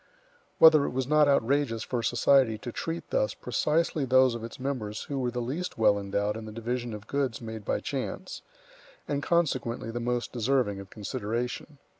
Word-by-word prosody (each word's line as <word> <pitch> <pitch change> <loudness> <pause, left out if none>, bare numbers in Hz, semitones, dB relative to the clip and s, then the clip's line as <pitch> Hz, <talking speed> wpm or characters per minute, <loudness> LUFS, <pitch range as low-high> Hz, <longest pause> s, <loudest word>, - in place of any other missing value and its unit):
Whether 155 -3 +7
it - - -1
was 130 0 -1
not 150 +2 +4
outrageous 140 -3 +2
for 125 -2 -2
society 120 +1 +3
to 120 +3 -7
treat 165 +7 -5
thus - - +1
precisely 155 -1 0
those 130 -1 +4
of 115 -1 -6
its 115 - -8
members 125 -6 -3
who 140 -1 -4
were 125 -2 0
the 120 0 -3
least 155 +9 -4
well 105 -2 +4
endowed 100 +1 -1
in 110 0 -6
the 110 - -7
division 120 +1 -3
of 105 0 -10
goods 135 -2 -1
made 110 -2 -7
by - - -1
chance, - - -4 0.7
and 140 0 -1
consequently 130 -9 0
the 120 - -3
most 120 0 -2
deserving 120 -4 +1
of 100 0 -10
consideration. 120 +6 -4
125 Hz, 180 wpm, -28 LUFS, 110-140 Hz, 0.7 s, Whether